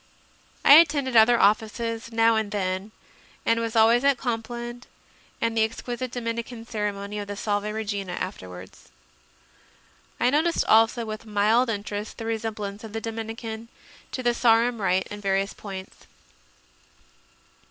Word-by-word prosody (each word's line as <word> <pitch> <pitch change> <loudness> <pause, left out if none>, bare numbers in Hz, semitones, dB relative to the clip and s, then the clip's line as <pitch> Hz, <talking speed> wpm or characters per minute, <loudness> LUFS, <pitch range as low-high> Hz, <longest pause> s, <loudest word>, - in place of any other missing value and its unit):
I - - +9
attended 290 -6 +3
other 230 +2 +6
Offices 225 +2 +1
now 225 0 +4
and 220 -2 0
then 190 0 -2 0.5
and 230 0 +3
was 230 -1 -3
always 230 +3 +5
at 280 -2 +4
Compline 240 0 -4 0.6
and 230 0 0
the 225 - +2
exquisite 240 +3 -2
Domin 230 -2 -3
ican 230 -1 -10
ceremony 210 -2 -3
of 205 - -5
the 205 - -5
Sake 205 0 -1
Regina 205 -4 -3
afterwards. 95 - -8 1.3
I 245 - +3
noticed 320 +4 +2
also 225 +2 +4
with 215 +1 -7
mild 215 +4 +3
interest 205 0 -4
the 225 - -6
resemblance 220 -2 -4
of 220 -2 -9
the 225 - -2
Dominican 225 0 -6 0.4
to 255 - -4
the 240 0 +3
Sarum 235 -1 +3
rite 190 -1 +1
in 205 0 -7
various 195 0 0
points. 190 -2 -9
225 Hz, 140 wpm, -25 LUFS, 205-235 Hz, 1.3 s, I